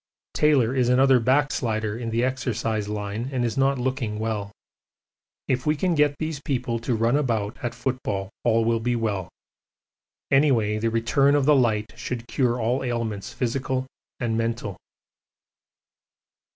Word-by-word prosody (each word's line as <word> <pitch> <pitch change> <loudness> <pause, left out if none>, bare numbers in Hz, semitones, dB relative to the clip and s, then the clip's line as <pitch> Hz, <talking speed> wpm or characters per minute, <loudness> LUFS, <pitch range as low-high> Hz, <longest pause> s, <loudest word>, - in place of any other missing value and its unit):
Taylor 135 -6 +3
is 125 -2 +2
another 130 +1 +5
backslider 115 -4 +1
in 115 0 -4
the 115 +2 0
exercise 115 -5 -1
line 105 +3 -3
and 125 -2 0
is 115 - -2
not 135 0 +2
looking 125 -4 -2
well. 105 -2 -3 1.0
If 130 +2 -1
we 150 - +3
can 180 +3 0
get 150 -2 +3
these 155 -2 -4
people 125 -4 -2
to 120 +1 -1
run 115 +3 +2
about 115 -7 0
at 120 -1 -3
football 120 -6 -3
all 115 -1 +3
will 115 0 +2
be 120 +2 0
well. 105 -6 -2 1.0
Anyway 120 -7 +3
the 115 +1 +1
return 135 +5 +3
of 145 -2 +2
the 150 0 +6
light 110 -4 +1
should 120 -1 -5
cure 125 -2 0
all 120 +4 0
ailments 115 -5 -3
physical 130 +1 -2 0.3
and 115 -3 -1
mental. 115 -3 -2
120 Hz, 150 wpm, -24 LUFS, 110-130 Hz, 1.0 s, the